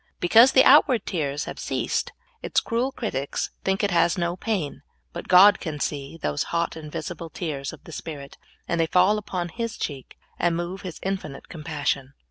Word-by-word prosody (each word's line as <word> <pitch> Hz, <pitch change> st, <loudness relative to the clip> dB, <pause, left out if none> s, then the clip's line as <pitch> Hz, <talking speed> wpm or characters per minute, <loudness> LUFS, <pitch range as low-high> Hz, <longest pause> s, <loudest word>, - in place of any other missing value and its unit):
Because 230 Hz, +9 st, +6 dB
the 260 Hz, -, +7 dB
out 290 Hz, +3 st, +8 dB
ward 245 Hz, -7 st, 0 dB
tears 145 Hz, -5 st, -2 dB
have -, -, -7 dB
cea.sed, -, -, -2 dB, 0.3 s
its -, -, +1 dB
cruel 240 Hz, +4 st, -1 dB
critics 140 Hz, -, -3 dB
think 190 Hz, +2 st, 0 dB
it 205 Hz, -, +1 dB
has 170 Hz, 0 st, +3 dB
no 170 Hz, 0 st, -1 dB
pain, 185 Hz, -10 st, -3 dB, 0.3 s
but 170 Hz, -, -7 dB
God 195 Hz, +2 st, +7 dB
can 155 Hz, -4 st, -5 dB
see 140 Hz, +1 st, -4 dB
those 75 Hz, -, -2 dB
hot, 170 Hz, 0 st, -1 dB
invisible 160 Hz, +2 st, -6 dB
tears 145 Hz, -6 st, -4 dB
of -, -, -13 dB
the -, -, -12 dB
spirit, 145 Hz, -3 st, -7 dB, 0.3 s
and 170 Hz, -1 st, 0 dB
they 165 Hz, -, +1 dB
fall 185 Hz, +5 st, +4 dB
upon 180 Hz, -4 st, -4 dB
His 230 Hz, +5 st, -4 dB
cheek 140 Hz, -3 st, -6 dB, 0.2 s
and 175 Hz, -1 st, +2 dB
move 175 Hz, +3 st, -4 dB
His 180 Hz, -3 st, -7 dB
in 195 Hz, +1 st, 0 dB
finite 145 Hz, -6 st, -11 dB
compas.sion. 145 Hz, -4 st, -3 dB
170 Hz, 185 wpm, -25 LUFS, 150-195 Hz, 0.3 s, out